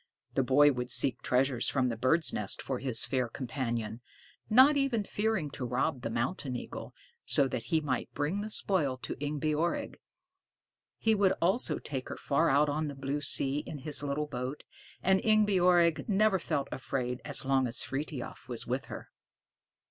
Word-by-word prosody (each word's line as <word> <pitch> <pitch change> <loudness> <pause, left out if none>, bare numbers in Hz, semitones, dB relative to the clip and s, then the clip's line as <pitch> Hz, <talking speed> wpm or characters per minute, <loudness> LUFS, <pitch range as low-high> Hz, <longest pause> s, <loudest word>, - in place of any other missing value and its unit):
The - - +2
boy 145 +3 +5
would 125 -2 -4
seek 135 - +2
treasures 130 -1 +1
from 130 -2 +1
the 115 - -2
birds' 130 +8 +1
nests 105 -2 -1
for 130 -2 -3
his 125 -4 +1
fair 130 -3 -1
companion, 115 -3 -4 0.5
not 260 +6 +7
even 270 -6 +1
fearing 205 -7 -1
to 135 - -6
rob 125 +1 -1
the 115 - -3
mountain 125 +3 -2
eagle, - - -7 0.3
so 140 -3 +3
that 120 -3 -4
he 160 -1 +1
might 135 -5 -2
bring 155 +8 -1
the 215 - -5
spoil 155 -11 +1
to - - -5
Ingebjorg. 150 +3 -1 1.0
He 220 - +2
would 200 -3 +3
also 190 +9 +1
take 135 -3 -5
her - - -6
far 160 +4 +1
out 145 +2 +4
on 150 +2 -1
the 145 - -6
blue 135 +2 -3
sea 140 0 +3
in 150 - -7
his 145 +2 -4
little 145 +1 -2
boat, 130 0 -5 0.4
and 190 +1 +3
Ingebjorg 180 -5 +3
never 205 -1 +3
felt 140 -4 -2
afraid 125 -2 -3
as 145 -2 +1
long 135 -1 +2
as 120 0 -3
Frithiof 135 -2 -5
was 120 -2 -3
with 130 +3 -2
her. - - -9
140 Hz, 170 wpm, -30 LUFS, 130-170 Hz, 1.0 s, not